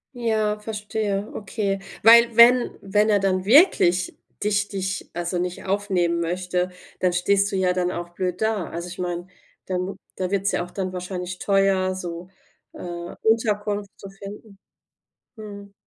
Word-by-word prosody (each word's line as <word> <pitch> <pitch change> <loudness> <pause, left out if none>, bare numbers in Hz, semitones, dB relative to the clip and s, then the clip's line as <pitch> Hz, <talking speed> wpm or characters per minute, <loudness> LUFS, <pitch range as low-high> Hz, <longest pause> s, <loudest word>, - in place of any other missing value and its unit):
Ja, 220 -3 0
verstehe, 210 -1 -3
okay, 200 -1 -2 0.2
weil, 235 +1 +7
wenn 240 +1 +7
wenn 210 +2 +2
er 205 - +5
dann 190 -1 0
wirklich 200 - +4 0.3
dich 205 -1 +1
dich, 190 -1 -4
also 175 +1 -2
nicht 180 0 -4
aufnehmen 190 -4 0
möchte, 180 +1 -1 0.3
dann 180 -1 +1
stehst 195 +3 +2
du - - -2
ja 185 -1 +2
dann 180 -1 0
auch 175 -1 -5
blöd 180 0 -3
da. 220 -6 -1
Also, 170 +1 -6
ich 180 - -10
meine, 175 -1 -3 0.4
dann 180 -1 -2
m 195 - -8 0.2
da 185 -1 -2
wird's 200 0 0
ja - - 0
auch 175 - -10
dann 185 -1 -4
wahrscheinlich 180 0 -5
teuer, 195 -1 +2
so, 175 -1 -6 0.4
äh, 175 0 -7
Unterkunft 210 -2 +1
zu 195 - -9
finden. 200 +1 -11 0.8
Mhm. 200 -2 -10
195 Hz, 155 wpm, -23 LUFS, 180-210 Hz, 0.8 s, weil